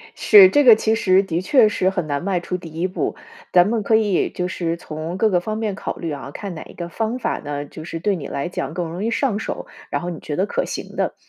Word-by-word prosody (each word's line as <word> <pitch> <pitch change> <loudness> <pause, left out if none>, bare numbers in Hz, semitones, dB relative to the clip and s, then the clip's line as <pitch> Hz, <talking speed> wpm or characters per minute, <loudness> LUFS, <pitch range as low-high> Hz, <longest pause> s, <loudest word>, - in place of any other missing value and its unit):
是， 400 -3 +8
这 290 -3 +4
个 240 -4 +9
其 220 0 +1
实 190 -3 +3
的 175 -3 -2
确 230 +4 +5
是 190 -3 +1
很 185 -3 -2
难 145 +1 -2
迈 190 -2 0
出 180 +1 -4
第 175 -2 -10
一 165 +4 -1
步。 185 - -3 0.4
咱 180 +1 +6
们 225 +1 0
可 220 - +3
以 210 -4 +2
就 180 - -3
是 170 -2 -2
从 160 +2 -6
各 220 +2 +3
个 180 -3 +2
方 215 +4 -4
面 220 -2 -2
考 - - -5
虑 165 - -5
啊， 140 -1 -6
看 200 +4 -6
哪 160 - -7
一 - - -14
个 170 - -6
方 225 +6 -2
法 - - -2
呢， 145 0 -5
就 155 - -10
是 165 0 -6
对 200 +4 +1
你 160 - -6
来 140 - -3
讲 175 - -4
更 175 -1 -3
容 180 +4 -5
易 225 - 0
上 235 -5 0
手， - - -5 0.2
然 - - -2
后 175 - -4
你 170 - -6
觉 150 - -5
得 190 - +1
可 - - -1
行 - - -6
的。 - - -1
185 Hz, 290 characters per minute, -21 LUFS, 165-215 Hz, 0.4 s, 个